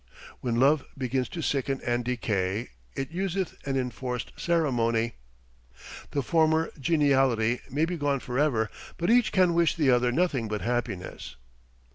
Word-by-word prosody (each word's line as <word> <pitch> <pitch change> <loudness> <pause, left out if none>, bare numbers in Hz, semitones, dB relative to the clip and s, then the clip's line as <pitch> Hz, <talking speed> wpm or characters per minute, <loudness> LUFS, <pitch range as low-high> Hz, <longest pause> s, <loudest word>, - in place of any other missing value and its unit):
"When 120 -2 -1
love 140 +2 +4
begins 130 -1 -1
to 170 -3 -5
sicken 135 -1 0
and 120 0 0
decay 110 -4 -1 0.3
It 135 +2 -4
useth 190 +1 -2
an 135 -1 0
enforced 125 -1 -3
ceremony." 120 -9 +1 1.0
The 140 - -1
former 160 +2 +2
geniality 135 -6 +2
may 145 +5 +1
be 175 +1 -3
gone 145 -2 0
forever, 125 -4 0 0.3
but 170 +5 +1
each 245 -1 +4
can 185 -3 +4
wish 170 -1 +3
the 150 -6 +3
other 125 0 +3
nothing 140 -6 +1
but 105 -1 -3
happiness. 110 - -3
135 Hz, 140 wpm, -27 LUFS, 120-160 Hz, 1.0 s, love